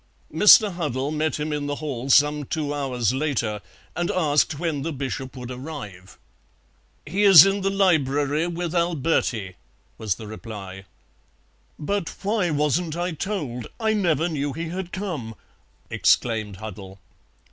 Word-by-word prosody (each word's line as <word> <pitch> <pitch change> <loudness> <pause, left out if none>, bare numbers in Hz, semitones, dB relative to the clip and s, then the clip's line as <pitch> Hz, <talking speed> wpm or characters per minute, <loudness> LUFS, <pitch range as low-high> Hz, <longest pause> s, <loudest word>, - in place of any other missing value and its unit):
Mr. 210 -1 +7
Huddle 145 -5 -2
met 155 -1 -1
him 150 0 -2
in 145 -1 -3
the 145 - -2
hall 140 -4 -5
some 150 +2 +4
two 145 0 -3
hours 125 -5 -1
later, 125 -7 -1 0.3
and 175 0 -1
asked 150 -4 +1
when 160 -3 -2
the 165 +4 -3
Bishop 135 -1 -5
would 125 0 -7
arrive. 125 - -9 0.9
"He 180 +7 -2
is 195 -6 +10
in 195 +1 0
the 195 - +1
library 155 -5 +1
with 175 -1 -4
Alberti," 160 - 0 0.4
was 105 -5 -1
the 110 - -10
reply. 105 -3 -9 0.9
"But 180 +1 -2
why 200 -3 +1
wasn't 155 +2 0
I 175 +1 -1
told? 150 - -4
I 220 -1 +1
never 170 -6 +1
knew 145 -4 -2
he 165 +2 -5
had 180 0 -5
come!" 160 - -5 0.6
exclaimed 110 -4 +1
Huddle. 100 -2 -9
150 Hz, 140 wpm, -23 LUFS, 125-175 Hz, 0.9 s, is